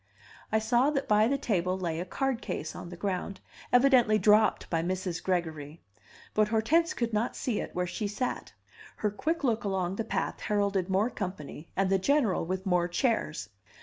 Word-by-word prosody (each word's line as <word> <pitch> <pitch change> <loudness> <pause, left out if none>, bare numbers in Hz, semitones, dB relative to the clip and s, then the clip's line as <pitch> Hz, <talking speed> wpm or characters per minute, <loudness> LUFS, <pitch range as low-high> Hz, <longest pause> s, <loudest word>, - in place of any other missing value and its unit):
I 220 - +3
saw 240 +5 +3
that 280 -2 -1
by 210 +1 +4
the 275 +3 +1
table 185 -8 0
lay 170 -3 -2
a 175 - -3
card 265 +5 -1
case - - -4
on 170 - -7
the 175 - -9
ground, 190 +1 -3 0.3
evidently 245 -4 +5
dropped 215 0 +4
by 165 -1 0
Mrs. 180 0 -2
Gregory; 160 -4 -3 0.5
but 215 0 +3
Hortense 305 +12 +2
could 235 -2 -2
not 215 +3 0
see 245 -6 -2
it - - -6
where 180 0 0
she 205 +4 -3
sat. 245 +5 -3 0.4
Her 210 - -1
quick 315 +10 -2
look 235 -3 +1
along 190 -2 -1
the 225 - -1
path 220 - -2
heralded 200 -3 0
more 200 +6 +2
company 170 -6 -6
and 195 0 +1
the 195 - +3
General 255 -2 +2
with 185 +3 -3
more 180 -2 +2
chairs. 175 - -1
205 Hz, 180 wpm, -29 LUFS, 180-235 Hz, 0.5 s, evidently